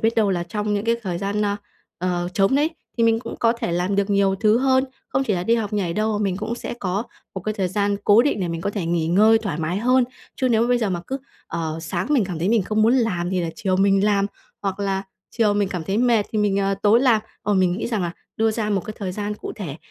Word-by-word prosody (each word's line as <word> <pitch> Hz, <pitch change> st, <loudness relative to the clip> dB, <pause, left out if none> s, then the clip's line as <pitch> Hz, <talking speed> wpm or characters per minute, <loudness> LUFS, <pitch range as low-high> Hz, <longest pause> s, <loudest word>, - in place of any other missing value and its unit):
biết 225 Hz, +1 st, +2 dB
đâu 210 Hz, -3 st, +3 dB
là 175 Hz, -2 st, 0 dB
trong 210 Hz, +4 st, -2 dB
những 205 Hz, -, -1 dB
cái 230 Hz, 0 st, +2 dB
thời 180 Hz, -4 st, -3 dB
gian, 200 Hz, +2 st, -1 dB
ơ, 205 Hz, 0 st, 0 dB, 0.4 s
ờ, 175 Hz, 0 st, -1 dB
trống 195 Hz, +5 st, +3 dB
đấy 295 Hz, +3 st, +2 dB, 0.3 s
thì 230 Hz, -, +3 dB
mình 225 Hz, 0 st, +4 dB
cũng -, -, -7 dB
có 230 Hz, -1 st, +3 dB
thể 235 Hz, -7 st, -3 dB
làm 180 Hz, +3 st, 0 dB
được 200 Hz, 0 st, +1 dB
nhiều 200 Hz, -1 st, +3 dB
thứ 215 Hz, +3 st, +3 dB
hơn. 260 Hz, 0 st, +3 dB, 0.2 s
Không 270 Hz, 0 st, 0 dB
chỉ 215 Hz, -, 0 dB
là 175 Hz, -, -1 dB
đi 230 Hz, -, +3 dB
học 220 Hz, -3 st, -2 dB
nhảy 195 Hz, -5 st, 0 dB
đâu, 215 Hz, +4 st, 0 dB
mà -, -, -1 dB
mình 190 Hz, -3 st, 0 dB
cũng 215 Hz, +3 st, -3 dB
sẽ 240 Hz, -, -5 dB
có 200 Hz, -3 st, -2 dB, 0.3 s
một 190 Hz, -, -4 dB
cái 215 Hz, +4 st, -3 dB
thời 190 Hz, -3 st, -1 dB
gian 200 Hz, +1 st, 0 dB
cố 210 Hz, +3 st, +6 dB
định 275 Hz, -6 st, 0 dB
để 180 Hz, -, -1 dB
mình 165 Hz, -1 st, -3 dB
có 200 Hz, -, -1 dB
thể 200 Hz, -5 st, -3 dB
nghỉ 165 Hz, -1 st, 0 dB
ngơi 215 Hz, +6 st, +5 dB
thoải 200 Hz, -9 st, -4 dB
mái 165 Hz, +4 st, -1 dB
hơn. 250 Hz, +3 st, +3 dB, 0.3 s
Chứ 260 Hz, -, +1 dB
nếu 230 Hz, -1 st, +3 dB
mà 240 Hz, -, +1 dB
bây 245 Hz, -, +3 dB
giờ 220 Hz, -4 st, 0 dB
mà 175 Hz, -2 st, -2 dB
cứ, 270 Hz, +1 st, -3 dB, 0.3 s
ờ, 160 Hz, -1 st, -3 dB
sáng 175 Hz, +3 st, -2 dB
mình 265 Hz, -9 st, +3 dB
cảm 180 Hz, -3 st, -5 dB
thấy 175 Hz, +4 st, 0 dB
mình 225 Hz, -2 st, +3 dB
không 215 Hz, +3 st, 0 dB
muốn 230 Hz, +3 st, +5 dB
làm 190 Hz, -8 st, 0 dB
thì 185 Hz, -, 0 dB
là 170 Hz, -1 st, -2 dB
chiều 195 Hz, -5 st, 0 dB
mình 195 Hz, 0 st, +3 dB
làm, 200 Hz, -1 st, +2 dB, 0.4 s
hoặc 195 Hz, -1 st, -2 dB
là 195 Hz, -1 st, -1 dB, 0.3 s
chiều 215 Hz, -3 st, +2 dB
mình 205 Hz, -2 st, +1 dB
cảm 180 Hz, -4 st, -4 dB
thấy 195 Hz, +5 st, -1 dB
mệt 235 Hz, -4 st, +3 dB
thì 220 Hz, -, 0 dB
mình, 205 Hz, -2 st, +2 dB
ờ, 195 Hz, 0 st, +1 dB
tối 215 Hz, +3 st, +5 dB
làm. 245 Hz, -5 st, +4 dB, 0.2 s
Ờ, 205 Hz, 0 st, +1 dB
mình 185 Hz, -2 st, +3 dB
nghĩ 190 Hz, -, -2 dB
rằng 220 Hz, -5 st, -1 dB
là 175 Hz, -1 st, -2 dB, 0.2 s
đưa 225 Hz, 0 st, +2 dB
ra 215 Hz, -1 st, -2 dB
một 195 Hz, -2 st, +1 dB
cái 215 Hz, 0 st, -6 dB
thời 190 Hz, -3 st, -3 dB
gian 210 Hz, +1 st, -3 dB
cụ -, -, -7 dB
thể, 165 Hz, -9 st, -5 dB
205 Hz, 285 wpm, -22 LUFS, 185-225 Hz, 0.4 s, cố